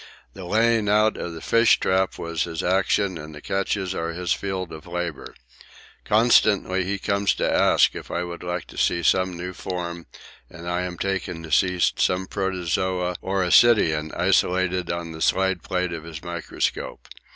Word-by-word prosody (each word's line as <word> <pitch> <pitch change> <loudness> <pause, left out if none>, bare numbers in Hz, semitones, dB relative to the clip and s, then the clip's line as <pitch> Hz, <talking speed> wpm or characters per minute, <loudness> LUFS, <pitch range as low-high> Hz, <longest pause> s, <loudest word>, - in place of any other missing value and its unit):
The 95 -2 -9
laying 110 +2 +2
out 105 +1 +3
of 85 -1 -5
the 80 - -8
fish 115 0 +4
trap 95 0 +1
was 85 -1 -2
his 80 -2 -5
action 95 0 +1
and 75 0 -9
the - - -9
catches 95 +2 -2
are 85 -2 -3
his 90 +1 -1
field 95 -3 -4
of 80 +2 -10
labour. 85 -3 -5 0.7
Constantly 105 -4 +3
he 100 +2 -2
comes 100 +1 0
to - - 0
ask - - +4
if - - -9
I 85 - -2
would 85 -1 -7
like 90 -1 -4
to - - -8
see 85 - +1
some 95 +2 +2
new 90 +1 -5
form 85 -2 -5 0.4
and 85 -1 -10
I 90 +1 -1
am 90 -1 -5
taken 95 -3 -3
to 80 - -9
see 90 +2 +2
some 90 +1 +1
protozoa 90 -1 -1
or 95 0 -1
ascidian 85 -6 +4
isolated 90 -1 +1
on 85 -1 -4
the 80 0 -9
slide 95 -1 +1
plate 90 -1 -2
of 80 -2 -6
his 80 -1 -8
microscope. 85 -1 -4
90 Hz, 175 wpm, -24 LUFS, 85-95 Hz, 0.7 s, fish